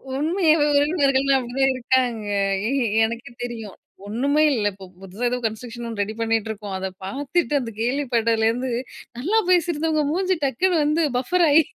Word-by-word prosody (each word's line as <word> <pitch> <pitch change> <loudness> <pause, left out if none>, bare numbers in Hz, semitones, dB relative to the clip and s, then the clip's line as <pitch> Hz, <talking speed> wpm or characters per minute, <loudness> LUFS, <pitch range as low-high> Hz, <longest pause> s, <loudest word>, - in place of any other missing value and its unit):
உண்மையா 320 +3 +2 0.2
உறவினர்கள்லா 280 -3 +3
அப்படிதான் 260 +2 0
இருக்காங்க. 245 -4 0 0.4
ஏ - - 0 0.4
எனக்கு 235 +2 -6
தெரியும். 225 -5 -7 0.3
ஒண்ணுமே 280 +8 +1
இல்ல 210 -4 0
இப்ப 195 0 -14
ஏதோ 180 - -21
புதுசா 200 +6 -3 0.2
கன்ஸ்டருக்ஷன் 235 +2 -5
ஒண்ணு 220 -3 -3
ரெடி 215 - -5
பண்ணிட்டு 225 -1 0
இருக்கோம். 205 -2 -6
அத 190 0 -3 0.2
பார்த்துட்டு 290 - -1
அந்த 230 -2 -5
கேள்விப்பட்டதுலேருந்து 240 -1 0 0.5
நல்லா 395 - +2
பேசியிருந்தவங்க 325 -3 +2
மூஞ்சி 370 +1 0
டக்குனு 345 +7 +1
வந்து 310 +2 +2
பஃபர் 345 +7 +2
ஆயி. 315 +3 +6
255 Hz, 145 wpm, -22 LUFS, 225-305 Hz, 0.5 s, ஆயி